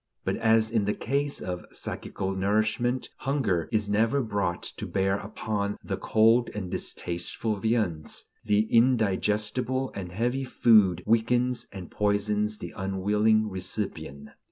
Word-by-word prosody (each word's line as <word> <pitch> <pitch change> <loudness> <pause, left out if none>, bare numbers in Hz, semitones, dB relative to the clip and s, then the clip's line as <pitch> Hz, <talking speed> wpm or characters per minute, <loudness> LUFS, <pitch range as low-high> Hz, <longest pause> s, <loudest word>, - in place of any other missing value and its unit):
But - - 0
as 110 -1 +3
in 110 -3 +1
the 105 - 0
case 140 +3 -1
of 90 -1 -4
psychical 95 0 -4
nourishment 110 +6 0
hunger 115 - 0
is 110 -2 +1
never 115 +6 +2
brought 100 -6 -2
to - - -5
bear 95 +1 0
upon 100 -1 -3
the - - -2
"cold 115 +2 +3
and 95 -4 -4
distasteful 90 +5 -2
viands," 105 -8 -1 0.2
the 105 -1 +3
indigestible 115 +2 +2
and 90 -3 -6
heavy 120 +7 -1
food 105 -8 +4
weakens 120 +2 +1
and 95 -3 -9
poisons 105 +1 0
the - - -7
unwilling 105 +3 +1
recipient. 90 -7 -4
105 Hz, 130 wpm, -27 LUFS, 95-115 Hz, 0.2 s, food